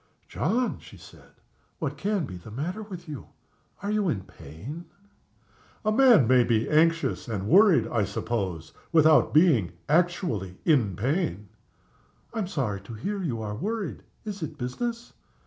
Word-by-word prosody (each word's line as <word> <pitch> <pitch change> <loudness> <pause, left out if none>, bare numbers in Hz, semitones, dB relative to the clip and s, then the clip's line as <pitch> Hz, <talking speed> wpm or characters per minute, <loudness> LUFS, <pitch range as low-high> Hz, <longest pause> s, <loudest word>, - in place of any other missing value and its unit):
"John!" 235 - -1
she - - -14
said. - - -16 0.4
"What - - -3
can 200 -3 -1
be 90 - -8
the 90 +3 -11
matter 160 - -4
with 185 -5 -9
you? 150 -4 -7 0.6
Are 205 - -1
you 210 -3 +1
in 105 -11 -1
pain?" 110 - -10 1.0
"A 215 - +3
man 230 - +6
may 125 0 +5
be 115 -2 +1
anxious 165 0 +2
and 100 -4 -3
worried, 180 - +6
I 115 -4 0
suppose, 95 -10 -3 0.2
without 155 -1 +5
being 145 - +4
actually 155 - 0
in 120 - +3
pain." 110 - -1 0.8
"I 225 - -3
am 200 - -1
sorry 115 - -2
to 105 +3 -9
hear 200 - -3
you 120 -11 -3
are 105 -1 -4
worried. 210 - -3 0.2
Is 205 -3 -5
it 155 - -5
business?" 230 - -4
150 Hz, 150 wpm, -26 LUFS, -, 1.0 s, man